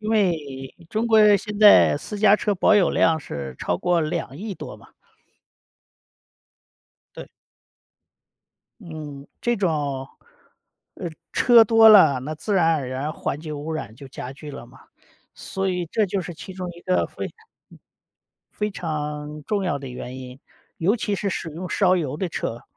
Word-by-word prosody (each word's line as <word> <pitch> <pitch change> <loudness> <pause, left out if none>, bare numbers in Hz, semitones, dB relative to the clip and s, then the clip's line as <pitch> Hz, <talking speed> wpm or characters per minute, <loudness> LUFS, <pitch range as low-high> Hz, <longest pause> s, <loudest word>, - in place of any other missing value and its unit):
因 215 +1 -3
为， 150 -11 -1
中 220 +2 -1
国 215 -2 +6
现 210 0 -6
在， 210 -8 +7
私 205 +7 -7
家 205 -1 +6
车 205 -1 -1
保 200 - +4
有 190 -4 +4
量 160 -1 +3
是 70 - -7
超 90 - -1
过 175 -1 +1
2 155 -3 -3
亿 200 +3 -6
多 - - -9
吧。 - - -19 2.2
对。 - - -8 1.5
嗯， 150 -6 -9
这 240 -1 0
种 145 -8 -1 0.9
呃， 175 - -5 0.2
车 235 -2 +6
多 225 0 +7
了， 155 -11 +7
那 155 +4 -5
自 205 +7 -4
然 165 -4 +3
而 140 -4 -2
然 130 +4 -3
环 145 - -4
境 155 -2 -6
污 155 +3 -5
染 135 -9 -5
就 140 +3 -12
加 130 0 -7
剧 150 +1 -10
了 135 - -9
嘛。 125 +2 -18 0.5
所 190 0 -3
以 180 -1 -2
这 215 +6 +1
就 190 +1 -2
是 175 -1 -7
其 190 - -10
中 185 -1 -6
一 170 - -14
个 185 - +1
非 - - -6
嗯， - - -7 1.2
非 210 0 -3
常 150 -3 -5
重 205 +2 -1
要 180 - -1
的 135 -1 -8
原 125 +1 -7
因。 130 0 -10 0.4
尤 195 +8 +2
其 210 -2 -2
是 200 +1 -2
使 165 - -4
用 175 +3 -7
烧 185 -2 +3
油 150 -5 -3
的 185 - -2
车。 115 -5 -4
165 Hz, 175 characters per minute, -23 LUFS, 145-200 Hz, 2.2 s, 在